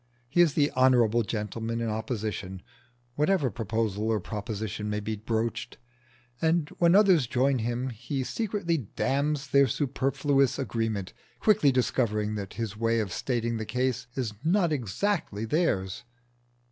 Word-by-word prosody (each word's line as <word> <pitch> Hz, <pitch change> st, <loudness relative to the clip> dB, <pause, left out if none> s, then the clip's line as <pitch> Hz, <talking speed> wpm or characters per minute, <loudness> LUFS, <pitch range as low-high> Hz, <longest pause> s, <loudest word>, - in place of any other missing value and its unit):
He 160 Hz, +8 st, +3 dB
is 160 Hz, -4 st, +3 dB
the 145 Hz, -1 st, +3 dB
honourable 120 Hz, -3 st, +4 dB
gentleman 110 Hz, +1 st, -3 dB
in 115 Hz, -, -1 dB
opposition, 105 Hz, -4 st, -4 dB, 0.5 s
whatever 150 Hz, -1 st, +2 dB
proposal 110 Hz, -2 st, -2 dB
or 110 Hz, -1 st, +1 dB
proposition 105 Hz, +1 st, -4 dB
may 105 Hz, 0 st, -1 dB
be 110 Hz, +1 st, -3 dB
broached, 110 Hz, +2 st, -3 dB, 0.6 s
and 160 Hz, -1 st, +2 dB
when 170 Hz, +1 st, +5 dB
others 190 Hz, -, +5 dB
join 130 Hz, +2 st, +2 dB
him 120 Hz, +3 st, -2 dB
he 120 Hz, +4 st, -4 dB
secretly 200 Hz, -, -1 dB
damns 140 Hz, +4 st, -1 dB
their 140 Hz, -1 st, +5 dB
superfluous 135 Hz, +1 st, +1 dB
agreement, 110 Hz, -6 st, -2 dB, 0.3 s
quickly 210 Hz, -10 st, +4 dB
discovering 110 Hz, -4 st, 0 dB
that 100 Hz, -3 st, -5 dB
his 110 Hz, -3 st, -3 dB
way 115 Hz, +1 st, +1 dB
of 100 Hz, -5 st, -2 dB
stating 115 Hz, -2 st, -1 dB
the 110 Hz, -, -3 dB
case 125 Hz, 0 st, -1 dB
is 120 Hz, -5 st, -2 dB
not 175 Hz, 0 st, +2 dB
exactly 130 Hz, -, -1 dB
theirs. 110 Hz, -, 0 dB
120 Hz, 135 wpm, -28 LUFS, 110-140 Hz, 0.6 s, when